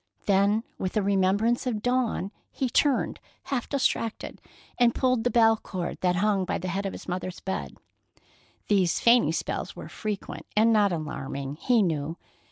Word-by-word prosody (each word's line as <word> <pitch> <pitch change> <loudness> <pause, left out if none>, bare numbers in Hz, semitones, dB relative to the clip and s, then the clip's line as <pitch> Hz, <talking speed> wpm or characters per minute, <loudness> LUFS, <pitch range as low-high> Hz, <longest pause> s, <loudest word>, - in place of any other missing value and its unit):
Then, 200 +2 +3 0.2
with 185 +2 -2
a - - +3
remembrance 200 +6 +2
of 215 -4 -2
Dawn, 245 -6 0 0.2
he 260 -3 -2
turned, 285 0 +2 0.2
half 255 -4 -3
distracted, 250 -5 -1 0.4
and 240 -1 +4
pulled 255 -3 +1
the 245 - +2
bell 225 -2 +5
cord 180 -4 -5
that 180 -1 +2
hung 200 +1 +2
by 180 - -1
the 185 - -4
head 195 +2 -2
of - - -5
his - - -9
mother's 185 0 -4
bed. 190 - -4 0.9
These 190 -4 +2
fainting 235 +1 +5
spells - - -3
were - - -9
frequent 210 -3 -5
and 225 +1 +5
not 205 -2 +4
alarming, 140 -3 -4
he 235 +4 +3
knew. 160 -2 -2
205 Hz, 165 wpm, -27 LUFS, 185-235 Hz, 0.9 s, bell